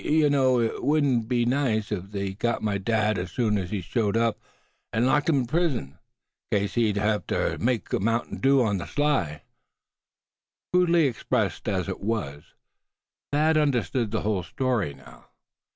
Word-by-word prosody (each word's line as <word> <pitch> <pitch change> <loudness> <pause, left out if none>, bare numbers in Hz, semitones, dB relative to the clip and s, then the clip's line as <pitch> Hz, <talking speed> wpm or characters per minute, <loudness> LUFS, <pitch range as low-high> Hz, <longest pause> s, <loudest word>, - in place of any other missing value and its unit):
Yuh 150 -1 +3
know 130 -3 +3
hit 115 -2 -1
wudn't 140 -7 +2
be 120 -1 +1
nice 120 -5 0
if 100 -2 -4
they 100 -1 -3
sot 115 0 +2
on - - -6
my 100 -2 0
dad 105 0 +1
as 90 -1 -5
soon 110 -2 +1
as 95 -4 -2
he 100 -1 -3
showed 105 +3 0
up, 115 -1 +1 0.5
an' 115 +3 +1
locked 145 +4 +2
him 140 -4 +3
in - - -3
prison, 135 - -1 0.5
'case 100 -1 0
as 110 -4 +2
how 105 - 0
he - - +3
use 105 - -3
ter - - -1
make 120 -1 -1
mounting 115 +3 -1
dew 135 -1 +4
on 105 -4 0
ther - - -6
sly." 100 - 0 1.3
Crudely 175 -3 +4
expressed 115 -4 -1
as 95 -4 -1
it - - -4
was, 100 -10 -4 0.8
Thad 155 +2 +3
understood 130 -5 +1
the 110 +1 -2
whole 105 -3 0
story 105 - -1
now. 65 - -17
115 Hz, 175 wpm, -26 LUFS, 100-135 Hz, 1.3 s, dew